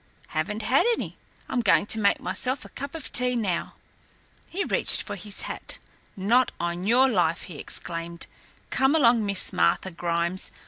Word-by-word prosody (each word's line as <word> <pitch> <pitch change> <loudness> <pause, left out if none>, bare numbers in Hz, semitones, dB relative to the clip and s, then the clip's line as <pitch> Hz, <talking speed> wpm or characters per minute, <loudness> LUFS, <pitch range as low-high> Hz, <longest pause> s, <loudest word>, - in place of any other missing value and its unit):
"Haven't 210 +8 -2
had 255 +6 +3
any. - - -6 0.3
I'm 250 - 0
going 210 - +3
to 220 - +1
make 200 -1 +3
myself 260 +2 -2
a - - -11
cup 280 +3 -7
of 320 - -6
tea 250 0 +2
now." 200 -7 -2 0.7
He 395 +3 -2
reached - - +2
for - - -6
his 205 +1 -5
hat. - - -3 0.4
"Not 235 +7 +3
on 175 +1 -3
your 250 +4 +5
life" 175 -9 +1
he 155 -5 -10
exclaimed. 170 0 -4 0.5
"Come 265 +3 +3
along, 235 -6 +4
Miss 200 -2 +4
Martha 85 - +1
Grimes. 170 +1 -1
205 Hz, 165 wpm, -25 LUFS, 170-250 Hz, 0.7 s, your